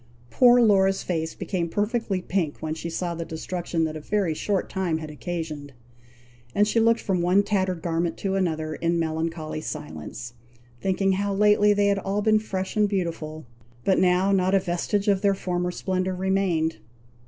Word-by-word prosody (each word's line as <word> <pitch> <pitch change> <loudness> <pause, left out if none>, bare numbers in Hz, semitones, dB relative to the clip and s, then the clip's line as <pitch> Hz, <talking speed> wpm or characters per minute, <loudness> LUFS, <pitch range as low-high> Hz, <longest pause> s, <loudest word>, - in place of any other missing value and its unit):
Poor 245 -1 +6
Laura's 195 -3 +3
face 160 -2 -2
became 175 -3 -2
perfectly 205 -1 -1
pink 175 -6 -1
when 155 0 -3
she 165 +1 -5
saw 170 +1 -2
the 165 0 -4
destruction 165 +1 -3
that 155 -1 -2
a - - -4
very 190 +1 0
short 195 +4 -1
time 180 -4 -1
had 155 -1 -7
occasioned: 150 -3 -5 0.8
and 205 +1 +4
she 230 - +2
looked 230 +1 +4
from 185 -4 -1
one 180 +3 +4
tattered 185 -4 -1
garment 170 0 -1
to 195 -1 -2
another, 160 -5 -1
in 170 +2 0
melancholy 160 -1 -2
silence, 120 - -7 0.5
thinking 195 0 +1
how 200 +1 0
lately 210 +1 +4
they 205 0 +3
had 200 -1 +2
all 195 +2 -2
been 215 0 +4
fresh 190 -3 -4
and 210 -1 +3
beautiful; 165 -5 -3 0.4
but 190 - +3
now 185 +1 +3
not 190 0 +3
a - - +5
vestige 190 +3 -1
of 195 -2 +3
their 200 -1 +3
former 180 -1 -2
splendour 185 +1 -2
remained. 185 - 0
185 Hz, 175 wpm, -25 LUFS, 165-200 Hz, 0.8 s, Poor